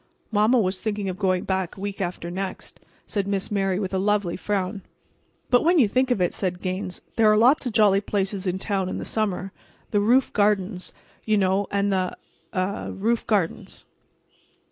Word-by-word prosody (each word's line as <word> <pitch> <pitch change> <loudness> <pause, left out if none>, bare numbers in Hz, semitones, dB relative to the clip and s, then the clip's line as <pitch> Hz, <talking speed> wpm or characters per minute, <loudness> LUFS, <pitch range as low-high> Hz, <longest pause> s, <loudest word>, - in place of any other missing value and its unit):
"Mamma 215 +4 +4
was 190 -4 0
thinking 205 -3 -2
of 185 +1 -5
going 185 -2 +1
back 190 0 -2
week 200 0 -5
after 175 -1 -3
next," 190 +1 -5 0.3
said 200 -3 -2
Miss 200 0 -1
Mary 195 -2 +1
with 195 -1 -3
a 190 - +1
lovely 200 -3 +1
frown. 195 0 -2 0.7
"But 245 - +5
when 345 +2 +4
you 255 -8 +5
think 255 +5 +1
of 245 - +1
it," 180 - +1
said 180 -2 -2
Gaines, 185 0 -4 0.2
"there 220 -2 +6
are 215 - +4
lots 255 +5 +4
of 240 - -3
jolly 205 -3 +4
places 200 -1 -2
in 180 +1 0
town 190 -1 -1
in - - -3
the - - -5
summer. 195 -3 -2 0.4
The 205 - +3
roof 245 +5 +3
gardens, 205 -2 +1 0.3
you 215 -1 +2
know, 195 +1 +2
and 200 0 +1
the—er—the 185 +1 -4
roof 230 +4 -1
gardens." 195 -7 -1
200 Hz, 180 wpm, -24 LUFS, 185-215 Hz, 0.7 s, there